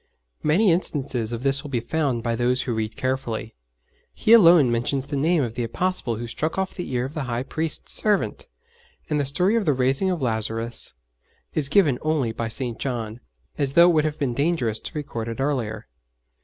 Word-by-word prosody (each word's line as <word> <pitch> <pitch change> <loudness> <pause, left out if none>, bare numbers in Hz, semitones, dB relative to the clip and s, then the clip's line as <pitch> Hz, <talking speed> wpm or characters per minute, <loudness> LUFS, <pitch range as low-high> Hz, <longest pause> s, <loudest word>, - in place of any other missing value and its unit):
Many 180 +6 +3
instances 135 -9 -1
of 120 +1 -4
this 135 0 +1
will 145 - -8
be 125 -3 0
found 125 -1 -1
by 115 -1 0
those 125 +2 +1
who 120 - -2
read 110 -1 -3
carefully. 130 -4 -3 0.6
He 220 - +4
alone 170 - +7
mentions 125 +3 0
the 145 - -4
name 155 +2 +2
of 115 -3 -3
the 120 - -3
Apostle 125 0 -1
who 120 +2 -5
struck 155 +9 -3
off 190 -1 -1
the 180 - -6
ear 125 0 0
of 135 - -7
the 155 -4 -3
High 120 0 -2
Priest's 160 +3 -3
servant, 210 - +1 0.6
and 150 - +2
the 145 - +1
story 180 +10 +1
of 225 -3 +1
the 150 - +3
raising 135 +8 +1
of 180 -2 -1
Lazarus 115 - -2 0.6
is 145 -3 0
given 155 -11 +3
only 150 -7 0
by 115 0 -3
St. 120 0 -3
John 115 -4 -3 0.4
as 140 -2 0
though 170 +3 +7
it - - 0
would 155 -1 +3
have 155 0 -2
been 135 -5 -1
dangerous 140 -6 0
to - - -7
record 120 -6 -4
it 115 +2 -5
earlier. 125 -7 -2
135 Hz, 200 wpm, -24 LUFS, 115-155 Hz, 0.6 s, alone